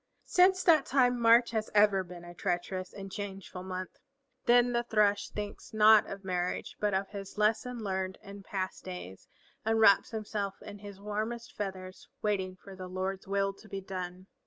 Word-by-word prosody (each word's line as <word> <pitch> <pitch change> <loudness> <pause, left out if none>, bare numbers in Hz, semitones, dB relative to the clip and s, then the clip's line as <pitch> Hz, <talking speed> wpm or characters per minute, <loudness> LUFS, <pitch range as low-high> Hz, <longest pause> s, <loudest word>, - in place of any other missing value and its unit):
Since 370 +1 +4
that 315 -6 +5
time 250 -2 +3
March 235 +1 +6
has 220 -1 -1
ever 205 -2 +5
been 175 -1 -11
a 175 - -10
treacherous 180 +1 -2
and 195 - -8
a - - -8
changeful 195 -3 -6
month. 185 0 -6 0.5
Then 245 0 +5
the 235 - +2
Thrush 210 -3 +2
thinks 210 +1 -7
not 215 0 +7
of 195 0 -7
marriage, 180 -1 -2
but 205 -2 +1
of 195 +1 -1
his 200 -1 -8
lesson 225 +3 +1
learned 190 -1 -2
in 200 0 -10
past 190 -1 -4
days, 180 - -8 0.4
and 225 0 +2
wraps 200 -3 +6
himself 210 -3 -4
in 205 0 -9
his 200 -1 -10
warmest 215 +3 -4
feathers, 190 -2 -6 0.2
waiting 190 -3 0
for 190 +1 -12
the 185 -1 -7
Lord's 190 +1 -3
will 195 0 +1
to 215 +2 -17
be 195 - -4
done. 185 -1 -6
200 Hz, 180 wpm, -31 LUFS, 190-220 Hz, 0.5 s, not